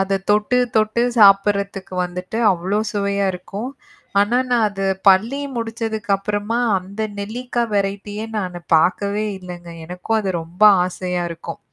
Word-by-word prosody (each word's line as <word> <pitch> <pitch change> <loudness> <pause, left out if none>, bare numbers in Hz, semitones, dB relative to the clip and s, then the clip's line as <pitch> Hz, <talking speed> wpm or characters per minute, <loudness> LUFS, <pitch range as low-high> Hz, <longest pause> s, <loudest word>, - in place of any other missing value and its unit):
அத 195 0 +1
தொட்டு 210 +4 +3 0.2
தொட்டு 215 +2 +2 0.2
சாப்பிடறதுக்கு 200 -1 +4
வந்துட்டு, 180 +4 -5
அவ்வளோ 185 +4 -1
சுவையா 200 -1 0
இருக்கும். 200 +7 -6 0.5
ஆனா, 210 +4 +2
நான் 235 -3 +3
அது 195 -1 -4 0.2
பள்ளி 220 +9 +4 0.2
முடித்ததுக்கு 225 -2 -4
அப்புறமா, 205 +3 -2 0.2
அந்த 195 +4 -9 0.2
நெல்லிக்கா 240 +3 -3
வெரைட்டியே 205 +1 -2
நானு 180 -3 -4 0.2
பாக்கவே 200 +5 +1
இல்லங்க. 175 -2 -9 0.2
எனக்கும் 180 +6 -2
அது 195 - -2
ரொம்ப 175 +5 -8 0.2
ஆசையா 180 -1 -3
இருக்கும். 165 0 -7
200 Hz, 130 wpm, -20 LUFS, 185-215 Hz, 0.5 s, சாப்பிடறதுக்கு